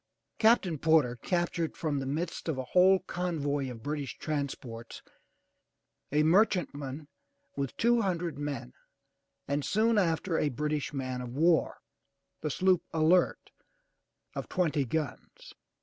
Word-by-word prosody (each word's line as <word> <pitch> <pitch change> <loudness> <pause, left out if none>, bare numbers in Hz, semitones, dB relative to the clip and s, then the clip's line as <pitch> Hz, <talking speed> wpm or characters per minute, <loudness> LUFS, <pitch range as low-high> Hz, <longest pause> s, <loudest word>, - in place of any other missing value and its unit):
Captain 210 - +4
Porter 155 -6 +3
captured 170 +4 -1
from 150 -4 -1
the 135 - -4
midst 160 +4 -3
of 150 - -1
a 130 - -2
whole 185 +1 +6
convoy 145 -7 -2
of 115 -3 -9
British 145 -2 -4
transports 130 -6 -5 1.1
a 150 +1 +3
merchantman 155 -6 +1 0.5
with 140 -2 -3
two 235 0 +3
hundred 175 -5 -1
men, 140 - -5 0.7
and 145 +1 -1
soon 220 +4 +2
after 165 -1 0
a 150 - +1
British 150 +2 -2
man 130 -3 -3
of 125 0 -7
war, 165 +1 +3 0.6
the 150 - -1
sloop 185 +4 +3
Alert 165 +3 +2 0.8
of - - -5
twenty 160 -6 +1
guns. 150 +2 -5
155 Hz, 125 wpm, -30 LUFS, 140-175 Hz, 1.1 s, whole